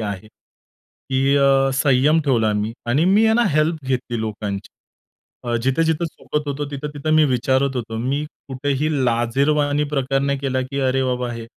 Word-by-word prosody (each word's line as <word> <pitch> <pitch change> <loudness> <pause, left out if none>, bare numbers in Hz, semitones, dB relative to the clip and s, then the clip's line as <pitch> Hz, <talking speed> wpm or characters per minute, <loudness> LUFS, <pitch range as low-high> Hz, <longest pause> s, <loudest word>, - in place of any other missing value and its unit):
आहे, 105 -1 -5
की 135 +4 -4
अ, 135 -1 +4
संयम 140 +3 +3
ठेवला 115 -6 +2
मी 105 +1 -2
आणि 135 +7 +2
मी 200 +4 +4
आहे 220 - +4
ना 240 - +3
हेल्प 155 0 0
घेतली 130 -2 -2
लोकांची. 105 -2 -4 0.8
अ, 120 -1 -2
जिथे-जिथे 160 +5 +1
चुकत 150 -2 -5
होतो, 145 +1 -2
तिथं-तिथं 150 +2 -3
मी 155 - +5
विचारत 130 +1 +1
होतो. 115 -2 -4
मी 135 +5 -1 0.2
कुठेही 140 +2 -1 0.2
लाजिरवाणा 140 +5 +1
प्रकार 135 -1 0
नाही 140 0 0
केला, 130 -1 -1
की 135 +2 -5
अरे 130 +1 +1
बाबा 125 -1 -1
हे 115 -1 -7
135 Hz, 160 wpm, -21 LUFS, 125-150 Hz, 0.8 s, मी